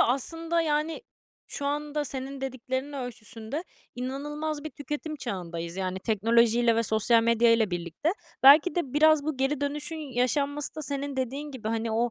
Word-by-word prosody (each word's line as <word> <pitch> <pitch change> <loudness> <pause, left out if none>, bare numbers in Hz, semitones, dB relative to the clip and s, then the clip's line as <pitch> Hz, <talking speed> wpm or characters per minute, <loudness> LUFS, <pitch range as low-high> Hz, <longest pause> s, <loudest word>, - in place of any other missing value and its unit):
aslında, 330 +6 +1
yani, 310 0 0 0.4
şu 280 - -5
anda 295 +1 -1
senin 270 0 -5
dediklerinin 260 +2 -3
ölçüsünde 245 - -6 0.3
inanılmaz 290 +4 -4
bir 310 - -4
tüketim 295 +3 -5
çağındayız 170 -7 -5
yani 185 -1 -2
teknolojiyle 230 +3 +3
ve 230 - +3
sosyal 225 +1 +3
medyayla 230 -2 +4
birlikte. 175 - -1 0.3
Belki 295 +4 +8
de 310 -8 -2
biraz 310 0 +5
bu 310 -3 -2
geri 270 +2 0
dönüşün 295 +3 -3
yaşanması 280 +1 -1
da 310 - -5
senin 280 0 -3
dediğin 270 +4 -3
gibi, 235 -5 -5
hani, 225 0 -1
o 235 +2 +1
265 Hz, 150 wpm, -27 LUFS, 230-295 Hz, 0.4 s, Belki